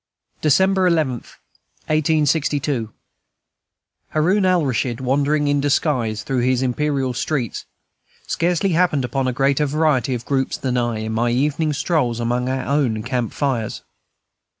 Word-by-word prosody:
December 190 +5 +3
11, 160 -6 +2 0.7
1862. 150 -5 +1 1.2
Haroun 185 +6 +2
Alraschid, 135 -9 +1
wandering 145 +3 +1
in 145 0 +2
disguise 125 -7 0
through 130 -2 -1
his 125 +1 +1
imperial 135 0 0
streets, 125 -2 -2 0.6
scarcely 175 +3 0
happened 165 -6 +2
upon 130 +2 -1
a - - +1
greater 135 +3 +1
variety 140 -4 +1
of 120 +1 -7
groups 135 -2 -1
than 130 -2 -2
I, 120 -3 -1
in 110 0 -4
my 115 +2 +1
evening 150 +5 0
strolls 140 -6 0
among 120 +2 -1
our 130 0 -2
own 130 -7 0
camp 120 -1 -2
fires. 130 -7 -2
135 Hz, 125 wpm, -20 LUFS, 125-155 Hz, 1.2 s, December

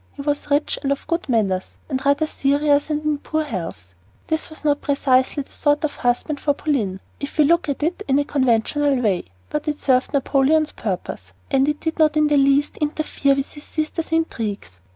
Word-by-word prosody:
He 280 - -7
was 290 0 -2
rich 290 +1 +1
and 275 - -1
of 280 - -2
good 335 -3 -2
manners, 195 -6 0
but 265 -3 -3
rather 285 +3 +3
serious 290 0 +1
and 300 0 -1
in 305 -1 +1
poor 315 +1 -1
health. 165 - -6 0.3
This 315 0 -2
was 315 -1 -11
not 290 -1 +2
precisely 275 -1 +2
the - - -25
sort 290 +1 +1
of 305 - -2
husband 245 +4 0
for 290 -1 +1
Pauline, 225 -12 -1 0.2
if 280 +2 -6
we 305 - +6
look 335 +1 +3
at 285 +1 -2
it 345 +5 -1
in 265 - +2
the 290 - +3
conventional 275 +1 +1
way; 200 -7 0 0.3
but 300 +1 -3
it 300 -1 -1
served 255 -1 +2
Napoleon's 290 +2 +2
purpose - - -5 0.2
and 270 -1 +4
did 320 0 -3
not 305 -1 +4
in 305 - +4
the 295 -1 +3
least 275 +1 +3
interfere 295 -2 0
with 275 0 -3
his 295 - -11
sister's 315 +1 -3
intrigues. 220 - -2
285 Hz, 195 wpm, -21 LUFS, 265-305 Hz, 0.3 s, we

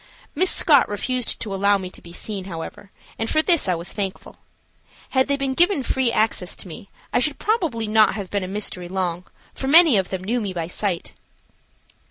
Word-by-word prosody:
Miss 365 +5 +2
Scott 290 -7 +5
refused 245 +4 0
to 210 -3 -4
allow 200 +1 +2
me 185 -1 -7
to - - -12
be 170 - -13
seen, 195 +1 -5
however, 170 +2 -8 0.3
and 225 0 -2
for 310 - +2
this 340 - +3
I 180 - +2
was 170 +3 -5
thankful. 195 -2 -5 0.7
Had 260 -1 +2
they 280 0 0
been 275 -1 -2
given 345 -1 +2
free 255 -2 +1
access 215 -5 0
to - - -8
me, 180 +3 -11 0.2
I - - +3
should 290 +3 -1
probably 335 - -1
not 215 0 +3
have 200 -4 -6
been 200 -2 -1
a - - -4
mystery 185 -3 -3
long, 180 -1 -3 0.3
for 265 - -5
many 315 -4 +7
of 190 -2 -1
them 185 -1 -4
knew 235 +5 -1
me 200 -3 -4
by 170 -2 -3
sight. 180 +1 -2
210 Hz, 205 wpm, -22 LUFS, 185-265 Hz, 0.7 s, many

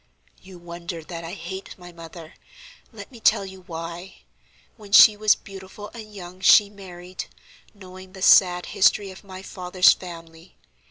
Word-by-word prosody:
"You 185 -1 -14
wonder 170 -1 -8
that 170 +1 -8
I 165 +1 -7
hate 190 +1 -8
my 175 -1 -13
mother; 165 -1 -12 0.6
let 205 -1 -12
me 240 - -13
tell 200 - +2
you 190 -1 -12
why. 170 +2 -8 0.5
When 210 -3 -15
she 215 +1 +8
was 215 0 +3
beautiful 195 +1 -12
and 220 -2 -11
young 185 -2 -11
she 200 +2 +6
married, 185 -2 -10 0.5
knowing 185 -1 -13
the 190 -1 -8
sad 180 -2 +5
history 195 +1 +2
of 185 - -14
my 190 -1 -11
father's 185 -1 +3
family. 165 -1 -12
185 Hz, 155 wpm, -23 LUFS, 175-195 Hz, 0.6 s, she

